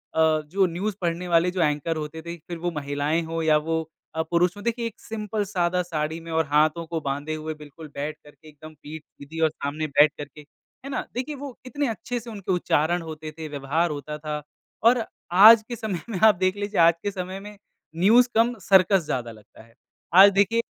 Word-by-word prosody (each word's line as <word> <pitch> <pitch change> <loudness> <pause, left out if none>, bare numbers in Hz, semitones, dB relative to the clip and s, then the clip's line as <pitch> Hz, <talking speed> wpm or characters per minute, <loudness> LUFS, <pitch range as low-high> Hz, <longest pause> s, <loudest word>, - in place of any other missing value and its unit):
अ, - - 0 0.3
जो 190 +5 +1
न्यूज़ 185 +4 -3
पढ़ने 175 +1 -2
वाले 170 +1 +3
जो 180 -2 -2
एंकर 150 +1 0
होते 155 +1 -6
थे 170 +1 -7
फ़िर 170 +1 -8
वो 175 +1 -2
महिलाएँ 145 +2 -1
हों 165 0 -3
या 155 -1 +4
वो 160 +1 -1 0.3
अ, 160 - +1
पुरुष 175 +3 +1
हों। 205 - -9
देखिए 235 0 -1
एक 225 - -11
सिंपल 215 -1 -4
सादा 180 -2 0
साड़ी 160 -1 -3
में 165 0 -10
और 160 0 +1
हाथों 155 +3 +2
को 165 -1 -3
बाँधे 145 +3 -3
हुए 155 0 -5
बिल्कुल 150 +1 -12
बैठ 150 +2 -4
करके 150 +1 -18
एकदम 155 +1 -13
पीठ 150 +1 -8
सीधी 155 +3 -11
और - - +3
सामने 155 +1 -4
बैठ 145 +1 +5
करके 145 +1 -9
है 260 - -16
ना? - - -3
देखिए 260 +5 -4
वो 275 -2 -8
इतने 285 +1 -2
अच्छे 240 +2 -4
से 230 +1 -11
उनके 200 -3 -5
उच्चारण 175 -1 +1
होते 155 -1 -7
थे, 160 -1 -6
व्यवहार 150 +4 -1
होता 150 +1 -5
था 150 0 -5 0.4
और 235 0 +5 0.4
आज 220 +1 +10
के 240 - -5
समय 210 -6 -4
में 190 -5 -3
आप 215 -3 +7
देख 185 +2 0
लीजिए 205 -1 -3
आज 165 0 +7
के 205 - -1
समय 185 0 -5
में 205 0 -11 0.4
न्यूज़ 230 +8 +5
कम 230 +2 +3 0.2
सर्कस 190 0 +5
ज़्यादा 120 -4 -3
लगता 110 0 -16
है। 115 0 -23 0.4
आज 200 +2 +9
देखिए 215 +4 +3
170 Hz, 210 wpm, -24 LUFS, 155-200 Hz, 0.4 s, आज